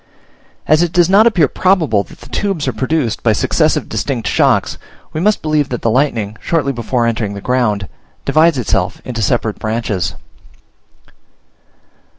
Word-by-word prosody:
As 155 +2 +4
it 175 -2 0
does 175 0 +3
not 210 +4 +6
appear 175 -10 +3
probable 160 - +2
that - - -16
the - - -13
tubes 195 -7 -2
are - - 0
produced 130 -5 -1
by 110 - +2
successive - - +1
distinct 120 -7 -3
shocks, - - +1 0.3
we 155 - -2
must 210 +3 +1
believe 155 -2 +1
that 125 - -4
the 115 - +2
lightning, 110 -5 0
shortly 150 -5 0
before 120 0 -1
entering 110 -3 -2
the - - -6
ground, 110 -4 0 0.4
divides 160 -1 +3
itself 100 -6 -1
into 120 -3 -4
separate 105 +1 0
branches. 110 -6 -2
125 Hz, 155 wpm, -16 LUFS, 110-160 Hz, 0.4 s, not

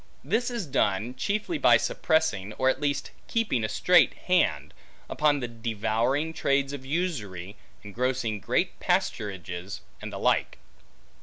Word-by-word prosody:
This 225 - 0
is 235 -6 -3
done, 115 -4 0
chiefly 215 - -2
by - - +6
suppressing, 110 - 0
or 130 +3 +2
at 130 - -1
least 145 -1 -1 0.2
keeping 215 - 0
a 110 - -1
strait 180 -2 +4
hand, 180 0 +1 0.3
upon 150 -2 +2
the 120 - -2
devouring 115 +6 -1
trades 140 -2 +1
of 140 -2 -6
usury, 115 - -3 0.3
ingrossing 115 0 -1
great - - 0
pasturages, 95 -2 -2 0.2
and - - -6
the - - -6
like. - - +1
130 Hz, 135 wpm, -27 LUFS, 105-160 Hz, 0.3 s, by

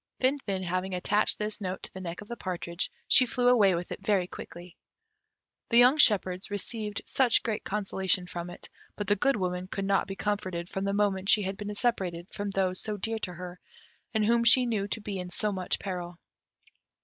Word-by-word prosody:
Finfin 255 -8 0
having 185 +1 -2
attached 205 +4 +2
this 210 0 -3
note 185 -1 -4
to - - -6
the 190 - -7
neck 170 0 -6
of 210 - -11
the 235 - -5
partridge, 180 -3 -3 0.2
she 255 - +6
flew 245 +1 +1
away 205 -7 +5
with 175 +1 -5
it - - -5
very 195 -3 +2
quickly. 175 0 -10 0.9
The 235 - +4
young 250 +5 +6
shepherds 190 -7 +3
received 210 +1 -4 0.4
great 220 -2 -2
consolation 190 -2 0
from 175 0 -6
it, 175 - -10 0.3
but 205 - -3
the 205 - +3
Good 275 +7 +2
Woman 180 -2 -2
could 195 +1 -3
not 195 0 +2
be 195 - -5
comforted 185 -4 -2
from 195 0 -3
the 200 - 0
moment 200 -1 +1
she 210 - +5
had 190 +1 -3
been 205 +1 -5
separated 185 -7 -1
from 205 0 -3
those 190 -2 0
so 210 -1 -2
dear 225 +3 -2
to 180 -4 -3
her, 180 +1 -8 0.5
and 215 -2 +1
whom 235 +1 +3
she 250 +2 +6
knew 215 -4 -1
to 220 - -3
be 200 -2 -4
in 180 0 -5
so 210 +4 -1
much 185 -2 -1
peril. 180 -3 -5
195 Hz, 200 wpm, -29 LUFS, 185-215 Hz, 0.9 s, she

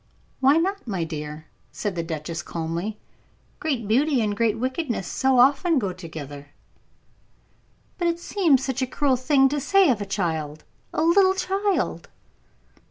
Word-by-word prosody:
"Why 270 +3 +5
not, 385 0 -1
my 190 -6 -2
dear?" 155 -1 -6 0.3
said 205 -2 -3
the 170 - -2
duchess, 165 0 -5
calmly. 170 +6 -4 0.6
"Great 265 -9 -2
beauty 270 +5 +2
and 210 -2 -1
great 225 0 +1
wickedness 255 - -2
so 265 +7 +1
often 280 +6 +4
go 200 -7 -1
together." 150 -5 -9 1.5
"But 345 - +1
it 335 0 0
seems 330 -8 +2
such 265 -1 -2
a 260 - 0
cruel 270 +1 +1
thing 270 +1 +3
to 295 +2 -1
say 390 +2 +4
of 220 -4 -1
a 205 - -4
child 160 -6 -3 0.3
a 310 - 0
little 375 +3 +4
child." 390 +1 -1
250 Hz, 150 wpm, -24 LUFS, -, 1.5 s, Why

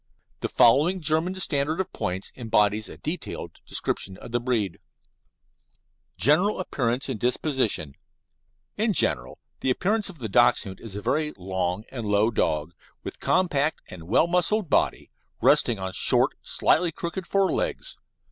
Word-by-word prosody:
The - - -3
following 150 +11 +4
German 160 +3 0
standard 155 -2 0
of 190 0 -3
points 90 +2 -3
embodies 110 -3 +1
a - - -10
detailed 160 +4 -5
description 95 -1 -3
of - - -11
the 120 - +1
breed: 115 -8 -1 1.4
GENERAL 180 +9 +3
APPEARANCE 125 -7 -1
AND 130 -6 -4
DISPOSITION 125 - 0 0.8
In 215 +1 +1
general 60 - +1 0.3
appearance 200 - +1
the 155 - -6
Dachshund 105 -3 +2
is 110 -4 -9
a 105 - -6
very 150 0 0
long 95 +1 -2
and 120 -5 -5
low 105 +2 +2
dog, 80 -6 -1 0.3
with - - -8
compact 160 -5 +1
and 85 -4 -10
well 115 - +4
muscled 180 +1 +1
body, - - +1 0.3
resting 120 - +4
on 95 -1 -5
short, - - +3
slightly 170 0 +2
crooked 170 +3 -5
fore 195 -1 +2
legs. - - -2
130 Hz, 140 wpm, -25 LUFS, 105-170 Hz, 1.4 s, following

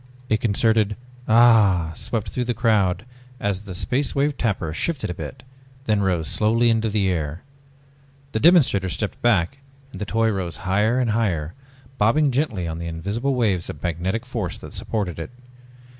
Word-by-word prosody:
A 110 - +4
concerted 110 -1 +2 0.3
ahhhh 105 -8 +5
swept 110 +4 -3
through 125 - -2
the 120 -1 -1
crowd 105 -4 +2 0.3
as 100 -2 -1
the 100 -3 -9
Space 130 +8 -1
Wave 140 +1 +1
Tapper 95 - -1
shivered 145 - -2
a - - -2
bit, 125 +8 -8 0.4
then 105 -2 +2
rose 90 -5 0
slowly 115 +2 +2
into 115 0 +1
the 100 -2 +1
air. 80 +1 -3 0.9
The 110 - -1
demonstrator 135 - +4
stepped 105 +3 -4
back 115 +1 +2 0.3
and - - -9
the - - -1
toy 115 +2 +1
rose 90 -6 -3
higher 105 +7 +2
and 120 -3 +1
higher, 90 -9 0 0.5
bobbing 135 +7 +3
gently 120 - -1
on 80 0 -4
the 85 - -5
invisible 100 +12 -2
waves 100 -8 0
of 70 - -8
magnetic 90 +7 -2
force 115 -8 -4
that - - -11
supported 95 -7 -3
it. 80 - -5
105 Hz, 165 wpm, -23 LUFS, 90-115 Hz, 0.9 s, ahhhh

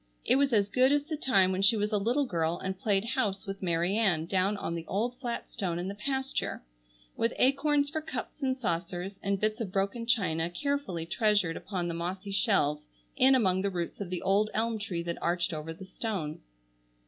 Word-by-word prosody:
It - - +4
was 280 -1 +3
as 205 -3 +3
good 255 +5 +4
as 290 0 +3
the 310 +1 -4
time 195 -10 +3
when 190 +1 -1
she 205 +3 +5
was 210 +1 0
a 210 - +2
little 245 +8 +1
girl 170 -6 0
and 190 0 -3
played 200 +1 +1
house 220 -5 -1
with 195 0 -6
Mary 175 +1 +1
Ann 190 -8 +2
down 190 +3 +1
on 170 - -3
the 165 -1 -5
old 235 +6 -1
flat 240 -3 -4
stone 180 -5 -3
in 175 +1 -3
the - - -4
pasture, 265 - -2 0.5
with 230 - +1
acorns 285 +2 +3
for 315 0 -2
cups 310 -1 -6
and 260 -1 0
saucers, 180 -3 -3
and 200 0 0
bits 215 +2 0
of 200 -5 -3
broken 200 +5 -1
china 175 -8 +1
carefully 190 - -2
treasured 205 -2 +2
upon 180 -4 -3
the 170 - -2
mossy 185 +4 -4
shelves 150 - +2 0.3
in 265 0 +6
among 190 -7 +3
the 200 - +1
roots 175 +1 -4
of 195 - -4
the 180 -1 -3
old 205 +2 +3
elm 225 0 0
tree 180 -5 -3
that 170 0 -4
arched 175 0 0
over 155 +1 -4
the 175 +4 -9
stone. 185 -7 -4
200 Hz, 205 wpm, -30 LUFS, 175-235 Hz, 0.5 s, in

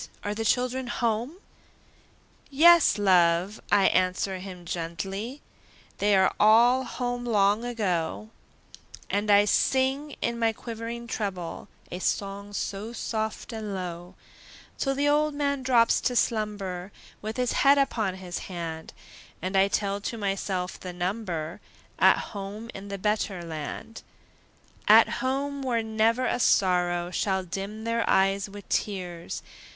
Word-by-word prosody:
are 205 - -2
the 225 +2 -3
children 250 +3 0
home?" 235 +4 -1 1.1
"Yes, 330 0 +6
love!" 185 0 +3
I 200 -1 +5
answer 185 +1 +1
him 180 -2 -9
gently, 195 - -5 0.6
"They're 195 -2 +4
all 235 +5 +5
home 245 -1 -3
long 210 -1 +2
ago;" 215 -3 -2 0.8
And 205 +1 0
I 205 0 +6
sing, 265 +6 +1
in 235 0 -2
my 225 -1 +2
quivering 230 +1 -6
treble, 195 -7 -4 0.2
A 180 - -4
song 200 +1 -2
so 205 +3 -4
soft 220 0 -3
and 215 -3 -4
low, 175 -1 -6 0.6
Till 270 -1 0
the 285 +1 +1
old 300 0 +2
man 280 -1 0
drops 245 -3 +3
to 250 - 0
slumber, 205 -5 -1 0.3
With 220 +2 -5
his 250 -1 +1
head 280 +1 +5
upon 220 -8 0
his 180 -2 -6
hand, 165 -3 -6 0.5
And 185 +3 -4
I 195 0 +5
tell 200 0 -1
to 230 - -4
myself 195 -3 -2
the 180 -1 -7
number 175 -3 -3 0.4
At - - +6 0.2
home 205 +3 -6
in 195 +1 -8
the 200 0 -5
better 200 -2 -1
land. 165 +7 -6 0.9
At - - +8
home, 275 +2 -1
where 240 -4 0
never 220 +3 +1
a - - 0
sorrow 175 -4 +2
Shall 190 0 0
dim 195 +4 -6
their 230 0 0
eyes 195 +1 +2
with 205 0 -11
tears! 180 -4 -3
205 Hz, 135 wpm, -27 LUFS, 185-235 Hz, 1.1 s, At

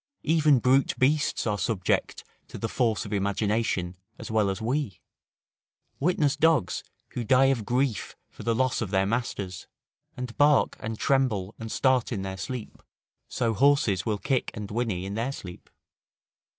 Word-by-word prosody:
Even 155 -3 +4
brute 130 +2 +2
beasts 145 +3 +1
are 105 -2 0
subject 105 -8 -1 0.2
to - - -9
the - - -2
force 115 -4 0
of 105 - -6
imagination 100 -2 0 0.2
as - - -8
well 110 -2 +2
as 95 - -3
we; 125 - -2 1.0
witness 150 -3 +2
dogs, 155 - +2 0.3
who 120 - -4
die 130 +3 +4
of 115 -5 -5
grief 125 -3 0
for - - -13
the 115 -1 0
loss 130 +1 +1
of 110 - -2
their 95 0 +2
masters; 100 -4 -3 0.5
and 125 -2 -5
bark 145 -1 +4
and 110 0 -5
tremble 115 -8 +1
and 115 -1 -6
start 130 -3 +2
in 100 -5 -2
their 95 0 -4
sleep; 125 +1 -6 0.5
so 115 -2 -1
horses 135 -5 +3
will 110 -3 -1
kick 135 +3 0
and 105 -2 -6
whinny 105 -5 -1
in 100 - -5
their 115 +5 -1
sleep. 90 -9 -10
115 Hz, 160 wpm, -27 LUFS, 100-135 Hz, 1.0 s, Even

